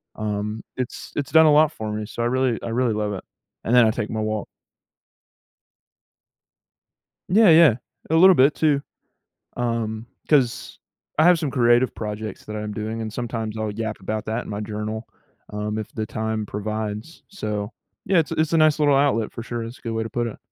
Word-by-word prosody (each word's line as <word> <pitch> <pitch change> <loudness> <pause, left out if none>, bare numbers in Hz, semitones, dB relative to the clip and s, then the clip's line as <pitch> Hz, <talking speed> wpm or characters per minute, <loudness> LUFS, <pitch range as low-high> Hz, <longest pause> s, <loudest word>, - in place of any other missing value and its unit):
um, 105 +1 -3 0.2
it's 125 -1 -5
it's 145 - -3
done 160 0 +7
a 155 - +6
lot 155 +1 +5
for 110 -9 -6
me, 105 0 -3
so 115 - -6
I - - +1
really 130 -1 +1
I - - -4
really 120 0 +1
love 105 -1 -2
it, 95 - -6 0.4
and 115 - -1
then 125 -2 +7
I 110 - +3
take 105 -1 -3
my 110 - -3
walk. 110 -1 -2 2.8
Yeah, 210 +3 +6
yeah. 160 -6 +7 0.4
A - - +2
little 185 +3 +8
bit 140 0 +4
too. 145 -3 +2 0.7
Um, 115 -2 -2 0.2
'cause 135 -6 +1 0.4
I 155 - +5
have 175 0 +6
some 155 -3 -2
creative 120 0 +3
projects 105 -1 -6
that 105 - -6
I'm 105 0 -4
doing, 110 +1 -4
and 110 -1 -4
sometimes 115 -2 -4
I'll 110 -1 -2
yap 110 0 -4
about 110 +3 -4
that 110 +3 -2
in - - -9
my 105 0 -4
journal, 105 +1 -4 0.4
um, 105 +1 -3
if 110 - -5
the 110 - -2
time 110 0 -3
provides. 105 - -5
So, 105 - -4 0.3
yeah, 190 -1 +3
it's 160 -3 +1
it's 155 0 0
a 165 - +4
nice 155 -1 +4
little 145 -2 +4
outlet 135 -6 +1
for 115 - -6
sure. 115 0 -4
It's 115 +2 -9
a - - -25
good 115 - -4
way 110 0 -1
to 110 - -5
put 120 -1 -1
it. 115 - -7
115 Hz, 200 wpm, -23 LUFS, 110-135 Hz, 2.8 s, little